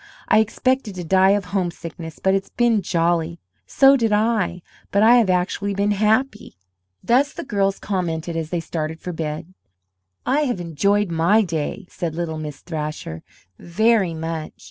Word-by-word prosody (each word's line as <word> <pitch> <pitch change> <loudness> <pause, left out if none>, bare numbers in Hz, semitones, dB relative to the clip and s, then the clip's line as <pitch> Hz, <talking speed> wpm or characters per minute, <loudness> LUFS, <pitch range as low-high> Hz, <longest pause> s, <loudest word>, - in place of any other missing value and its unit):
"I - - +5
expected 225 0 0
to 180 - -5
die 190 +3 +4
of 200 - -5
homesickness, 170 -3 -4
but 190 - +1
it's 195 0 -1
been 235 -3 +2
jolly!" 170 -1 0 0.3
"So 270 0 +6
did 230 -4 +1
I, 210 -5 +1 0.3
but 200 +1 +2
I 235 +2 +7
have 225 -5 +3
actually 185 +2 0
been 200 +1 +1
happy." 215 - 0 0.5
Thus 270 +5 +2
the - - -6
girls 195 -4 0
commented 170 -4 -3
as 160 -1 -3
they 175 -1 -2
started 160 -1 -4
for 180 - -6
bed. 160 +2 -5 0.7
"I 275 +3 +2
have 245 -8 -2
enjoyed 195 +4 0
my 170 +7 +3
day," 170 +2 -3
said 165 -3 -5
little 165 -2 -3
Miss 150 -2 -7
Thrasher, 150 - -5 0.4
"very 200 -1 +2
much." 160 -1 -5
185 Hz, 160 wpm, -21 LUFS, 165-210 Hz, 0.7 s, I